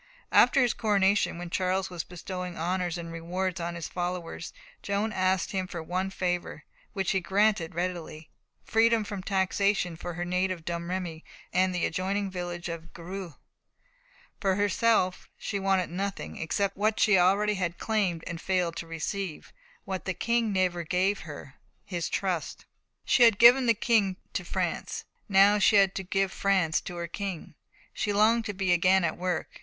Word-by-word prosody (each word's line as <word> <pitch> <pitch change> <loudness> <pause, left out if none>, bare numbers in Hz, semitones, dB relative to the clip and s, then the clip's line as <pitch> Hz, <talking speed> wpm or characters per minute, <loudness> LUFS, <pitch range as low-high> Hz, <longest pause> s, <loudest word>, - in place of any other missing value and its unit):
After 275 - +6
his 240 - +2
coronation, 200 -4 +2
when 175 0 -7
Charles 185 +1 0
was 170 -2 -4
bestowing 180 0 -6
honours 175 +1 -1
and 170 -1 -6
rewards 180 +2 -3
on 170 0 -3
his 170 -2 -5
followers, 175 -1 -4 0.3
Joan 205 +2 -1
asked 185 -1 +1
him 190 -2 -2
for 170 -2 -6
one 185 +3 -2
favour, 180 -4 -3 0.3
which 195 -3 0
he 190 - +2
granted 195 -2 +1
readily 170 -3 -4 0.3
freedom 225 0 +3
from 205 -2 -5
taxation 195 -1 +1
for 175 +1 -6
her 175 +1 -3
native 180 -1 -1
Domremy 170 -1 -4 0.3
and 185 +1 +3
the 180 - +1
adjoining 195 +3 -1
village 175 -1 -5
of 165 0 -7
Greux. 180 -1 -7 1.0
For 195 -2 +1
herself 205 -2 +1
she 200 - -3
wanted 190 -3 +1
nothing, 195 +2 -4
except 195 +4 -1
what 215 +2 +1
she 210 - +4
had 185 - +6
already 205 +3 +3 0.2
claimed 195 -7 0
and 170 0 -6
failed 180 -3 0
to 165 - -5
receive, 165 +2 -5 0.3
what 190 -1 -4
the 190 - -2
King 230 +3 +1
never 185 -2 +1
gave 185 +4 +1
her 145 -1 -10 0.3
his 175 -3 -3
trust. 185 -5 -2 0.4
She - - +3
had 230 -4 +7
given 245 +2 +7
a 230 - +5
king 205 -4 +2 0.2
to - - -2
France, - - -3 0.3
now 200 +1 +6
she 210 - +5
had 195 -1 +5
to - - -3
give 195 +1 0
France 190 -6 +1
to 175 - -6
her 170 0 -3
King. 185 -2 -5 0.4
She 210 - -1
longed 220 +3 +3
to 205 - -3
be 190 -2 +1
again 185 +2 +4
at 160 - 0
work. 180 -1 -3
185 Hz, 165 wpm, -28 LUFS, 175-200 Hz, 1.0 s, had